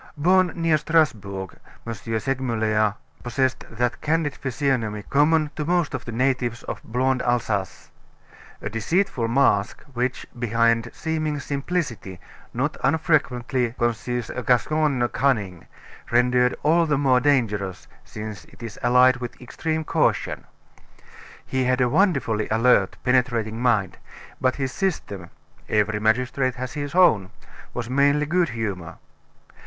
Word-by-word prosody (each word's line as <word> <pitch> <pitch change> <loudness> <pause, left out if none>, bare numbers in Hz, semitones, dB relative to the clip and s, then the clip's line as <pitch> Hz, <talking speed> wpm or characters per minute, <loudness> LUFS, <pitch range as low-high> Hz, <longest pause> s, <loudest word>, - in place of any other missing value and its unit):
Born 180 +3 +3
near 165 -2 +2
Strasbourg, 100 - 0 0.3
M. 115 - -3
Segmuller 110 -2 -1 0.3
possessed 130 +2 -1
that 120 +1 -2
candid 155 -1 0
physiognomy 120 -6 -2
common 150 +3 +2
to 150 - -2
most 175 -1 0
of 130 -1 -4
the 115 - -6
natives 125 -1 0
of - - -6
blonde 130 +2 0
Alsace 110 -6 -2 0.7
a 100 - -2
deceitful 120 - 0
mask, 115 -4 +2
which, 125 +1 -2
behind 115 0 +2
seeming 155 -2 -2
simplicity, 140 - -3 0.3
not - - -2
unfrequently 130 -4 +1
conceals 120 0 -2
a 125 - -4
Gascon 130 +1 +2
cunning, 105 -10 -1 0.4
rendered 125 +1 +3
all 165 +3 +3
the 145 -2 +2
more 135 -3 +3
dangerous 110 -9 0 0.2
since 105 -1 -8
it - - -15
is 115 -2 -7
allied 125 +1 +5
with 120 -1 -7
extreme 155 +5 -3
caution. - - 0 1.0
He 130 -1 -1
had 125 +1 +2
a 125 - +3
wonderfully 135 - +1
alert, 115 -3 +3
penetrating 120 -3 +1
mind; 110 -7 +1 0.4
but 130 0 +2
his 135 -2 -2
system 100 - -3 0.4
every 105 0 +1
magistrate 125 +4 +1
has 125 0 -5
his 145 +1 -5
own 110 - +4 0.5
was 120 -2 -3
mainly 140 +3 +3
good 170 +3 +1
humor. 100 -8 -4
125 Hz, 125 wpm, -23 LUFS, 115-145 Hz, 1.0 s, allied